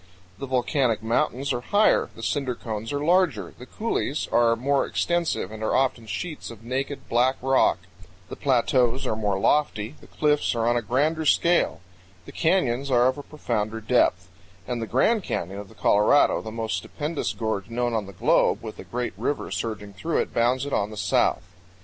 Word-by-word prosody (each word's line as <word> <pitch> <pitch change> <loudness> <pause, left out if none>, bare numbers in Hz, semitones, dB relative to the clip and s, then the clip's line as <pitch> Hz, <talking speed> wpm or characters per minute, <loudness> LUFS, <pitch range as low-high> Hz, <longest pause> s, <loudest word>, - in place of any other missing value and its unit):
The 135 - -5
volcanic 125 -2 +1
mountains 125 +4 0
are 120 - -2
higher, 205 +10 +3
the - - -10
cinder 135 -4 -1
cones 110 -1 -5
are 145 0 -2
larger, 160 - +2
the 125 - -10
coulees 185 - -2
are 115 -1 +4
more 135 +4 +1
extensive 170 - -1
and 110 0 -8
are 110 - 0
often 125 -4 0
sheets 150 - -5
of 115 -1 -11
naked, 135 +4 -4
black 125 +3 +2
rock, 135 -5 +3 0.5
the - - -7
plateaus 125 -1 +1
are - - -1
more 105 -3 -1
lofty, 115 -2 +1
the - - -15
cliffs 150 -4 +1
are 115 0 0
on 120 - +3
a 120 - +1
grander 145 +9 0
scale, 170 - +2 0.4
the - - -10
canyons 140 -6 +1
are 120 -2 +4
of 140 +2 -6
profounder 110 -7 -2
depth; 105 -5 +2 0.4
and 120 -2 -3
the 115 - -3
Grand 210 - +2
Canyon 95 - -4
of 100 -1 -9
the - - -17
Colorado, 105 +8 +3
the 110 - -7
most 110 0 -3
stupendous 155 +1 -3
gorge 110 -3 -3
known 120 0 -1
on 110 -3 -1
the - - -8
globe, 90 - +2
with - - -8
a - - -7
great 125 0 -4
river 130 +7 -2
surging 105 -3 -4
through 160 +10 -2
it, - - -1
bounds 125 +3 +1
it 145 - -5
on 100 - 0
the 110 - -9
south. 90 - +1
120 Hz, 185 wpm, -25 LUFS, 110-140 Hz, 0.5 s, are